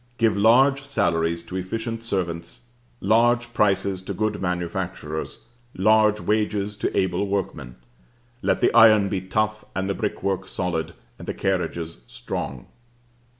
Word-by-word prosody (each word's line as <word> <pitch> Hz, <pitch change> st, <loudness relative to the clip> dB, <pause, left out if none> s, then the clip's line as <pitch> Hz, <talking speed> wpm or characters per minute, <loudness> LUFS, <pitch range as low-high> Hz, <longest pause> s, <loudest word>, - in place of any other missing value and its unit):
Give 115 Hz, -3 st, +2 dB
large 130 Hz, +7 st, +4 dB
salaries 85 Hz, -10 st, 0 dB
to 95 Hz, -, -6 dB
efficient 115 Hz, +5 st, -4 dB
servants, 85 Hz, -1 st, -3 dB, 0.4 s
large 120 Hz, +3 st, +3 dB
prices 100 Hz, -3 st, +1 dB
to 95 Hz, +1 st, -6 dB
good 105 Hz, +1 st, -1 dB
manufacturers, 85 Hz, -3 st, -4 dB, 0.3 s
large 105 Hz, +2 st, +4 dB
wages 105 Hz, -1 st, 0 dB
to -, -, -2 dB
able 95 Hz, +2 st, +1 dB
workmen; 80 Hz, -10 st, -3 dB, 0.7 s
let -, -, +1 dB
the -, -, +3 dB
iron 110 Hz, -3 st, +7 dB
be 95 Hz, -2 st, -2 dB
tough, 110 Hz, +3 st, -1 dB
and 95 Hz, 0 st, -1 dB
the 100 Hz, -, 0 dB
brickwork 95 Hz, -2 st, -2 dB
solid, 85 Hz, -4 st, -3 dB, 0.2 s
and -, -, -10 dB
the -, -, -3 dB
carriages 85 Hz, -5 st, -2 dB
strong. -, -, -5 dB
100 Hz, 130 wpm, -24 LUFS, 90-110 Hz, 0.7 s, iron